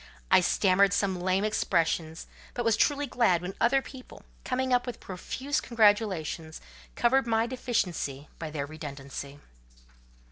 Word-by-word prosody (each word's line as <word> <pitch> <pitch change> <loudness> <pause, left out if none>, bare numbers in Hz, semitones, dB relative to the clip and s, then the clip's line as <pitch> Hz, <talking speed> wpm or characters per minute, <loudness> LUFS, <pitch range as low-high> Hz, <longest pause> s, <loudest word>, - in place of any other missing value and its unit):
I 185 - +7
stammered 195 +2 +3
some 195 -3 0
lame 185 +2 +1
expressions; 165 -6 0 0.3
but 240 - -2
was 225 -2 +4
truly 290 +4 +2
glad 225 -10 +2
when 185 +2 -4
other 265 +3 +3
people, 260 -2 -12 0.2
coming 260 0 -1
up 245 +1 +2
with 245 - -5
profuse 260 +10 -3
congratulations, 205 -8 +1 0.4
covered 265 +2 +2
my 225 0 +2
deficiency 185 - -2
by 160 - -4
their 150 -2 -3
redundancy. 140 -2 -8
200 Hz, 135 wpm, -28 LUFS, 165-240 Hz, 0.4 s, I